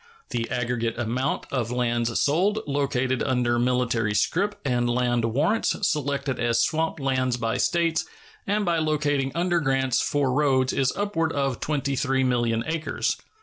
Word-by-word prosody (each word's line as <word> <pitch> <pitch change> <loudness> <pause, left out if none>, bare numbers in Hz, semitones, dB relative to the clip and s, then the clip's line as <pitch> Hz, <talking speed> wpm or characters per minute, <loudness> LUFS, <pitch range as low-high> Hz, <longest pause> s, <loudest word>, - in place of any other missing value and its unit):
The 115 -1 -2
aggregate 120 -2 -1
amount 125 +4 -1
of 120 -4 -1
lands 120 -1 0
sold, 190 +9 +2
located 130 -3 0
under 125 -2 +1
military 120 -3 +1
scrip 195 - 0
and 120 -2 +1
land 120 -1 +1
warrants, 150 - +1
selected 140 -3 -1
as 120 -1 +1
swamp 160 +2 -1
lands 130 -2 0
by 115 -1 -1
States, 165 -1 +1 0.4
and 205 +1 +1
by 170 -2 +1
locating 145 -3 0
under 175 0 +1
grants 135 -4 +1
for 140 -3 0
roads 130 -2 +2
is 135 -2 +1
upward 165 -6 -1
of 135 -3 -1
23,000,000 130 -5 0
acres. 160 -1 -1
130 Hz, 140 wpm, -25 LUFS, 120-150 Hz, 0.4 s, sold